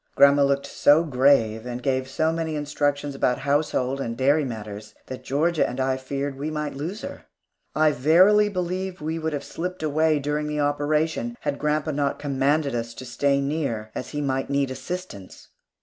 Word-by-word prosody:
Grandma 140 0 +6
looked 140 0 +1
so 150 +3 +4
grave, 125 -6 +3
and 125 0 -5
gave 130 -1 0
so 160 +4 0
many 165 -1 -2
instructions 145 -1 -1
about 125 -2 +1
household 140 -2 0
and 115 -2 -4
dairy 145 +4 +3
matters, 105 -4 -7
that 130 - -8
Georgia 155 +4 +1
and 125 +2 -6
I 130 0 +1
feared 140 +2 -4
that 135 - -14
we 150 +2 -2
might 150 -1 -3
lose 165 - -5
her. 280 - -8 0.5
I 155 0 +4
verily 185 +10 +5
believe 185 0 -3
we 160 +2 -3
would 160 -1 -2
have 140 -1 -3
slipped 180 0 -5
away 155 +1 +2
during 150 +1 -2
the 150 0 -2
operation, 150 +10 0
had 145 -1 -2
grandpa 150 +1 0
not 140 -1 -1
commanded 140 +1 0
us 115 -1 -3
to 130 - -8
stay 140 +3 +1
near, 140 -7 -2
as - - -5
he 150 - -3
might 135 -1 -1
need 140 -1 0
assistance. 130 - -7
145 Hz, 180 wpm, -24 LUFS, 130-155 Hz, 0.5 s, Grandma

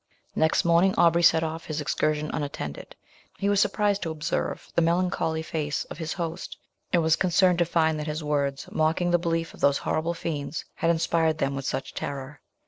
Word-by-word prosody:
Next 160 +2 +2
morning 170 +3 +4
Aubrey 170 0 +5
set 165 -1 +5
off 160 0 -3
upon - - -14
his 155 -1 -3
excursion 150 0 0
unattended; 140 - -5 0.4
he 200 - 0
was 205 -1 +3
surprised 205 0 +1
to 165 - -2
observe 155 -1 -3
the - - +2
melancholy 165 -1 0
face 150 -2 -2
of - - -7
his 160 -1 -3
host, 170 -2 -5 0.3
and 170 -2 +3
was 160 0 +4
concerned 180 -1 +3
to 175 - +4
find 160 -2 +1
that 150 - -4
his 155 +1 -3
words, 140 -2 -1
mocking 160 +3 +1
the 175 - +4
belief 165 -1 -1
of - - -14
those 140 0 +3
horrible 165 +2 -1
fiends, 155 -2 -4
had 165 - 0
inspired 165 -1 +2
them 135 -2 -1
with 135 -1 -5
such 135 - -3
terror. 140 0 -6
160 Hz, 195 wpm, -26 LUFS, 150-170 Hz, 0.4 s, Aubrey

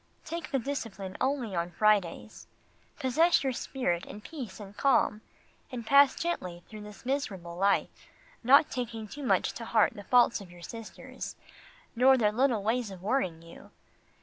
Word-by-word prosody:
Take 335 0 -5
the 275 - +1
discipline 225 -8 -5
only 260 -7 -1
on 170 0 -1
Fridays. 210 +1 0 0.5
Possess 320 +7 +3
your 265 -1 0
spirit 205 -9 -2
in 205 - -8
peace 245 - -8
and 205 -1 -10
calm, 240 -5 +2 0.5
and 240 -3 -6
pass 280 +2 +6
gently 180 - -3
through 215 -1 -10
this 210 +2 -12
miserable 195 -11 -3
life, 195 +3 0 0.4
not 275 +5 +6
taking 230 -4 -4
too 290 +8 -9
much 265 - +2
to - - -7
heart - - +3
the - - -9
faults 245 -3 +4
of 190 - -11
your 175 0 -14
sisters, 225 +2 -8 0.6
nor 260 +2 +6
their 210 -4 +3
little 240 -2 +1
ways 230 +1 0
of 190 -2 -10
worrying 190 -8 -1
you. 170 0 -14
225 Hz, 160 wpm, -29 LUFS, 195-265 Hz, 0.6 s, pass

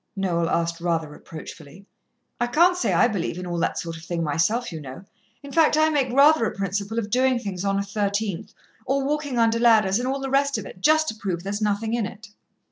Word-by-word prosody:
Noel 170 -4 0
asked 170 0 -1
rather 165 -2 0
reproachfully. 155 +3 -11 0.5
"I 240 - +1
can't 340 +8 +4
say 360 - 0
I - - +4
believe 185 -7 -3
in 180 - -5
all 175 -1 -3
that - - -1
sort 165 0 -5
of 160 - -13
thing 170 0 -3
myself, 190 +11 0
you 160 -2 -6
know. 135 +7 -10 0.4
In 280 - -9
fact 315 0 +4
I 310 0 +4
make 275 -5 0
rather 280 +1 +5
a - - -3
principle 200 +3 -3
of 210 -2 -2
doing 255 +1 +3
things 200 -6 -5
on 195 0 0
a - - +1
13th, 200 0 -3 0.3
or 270 +1 0
walking 290 -3 -2
under 230 0 +3
ladders, 220 -4 +4
and 250 - -2
all 270 +1 -1
the 270 -1 -4
rest 275 -1 +2
of 215 - -6
it, 185 - -11
just 315 +4 +4
to - - -5
prove 185 -5 -4
there's 200 +2 -4
nothing 215 +2 -1
in 235 -4 0
it." 220 +1 -12
210 Hz, 225 wpm, -24 LUFS, 180-255 Hz, 0.5 s, rather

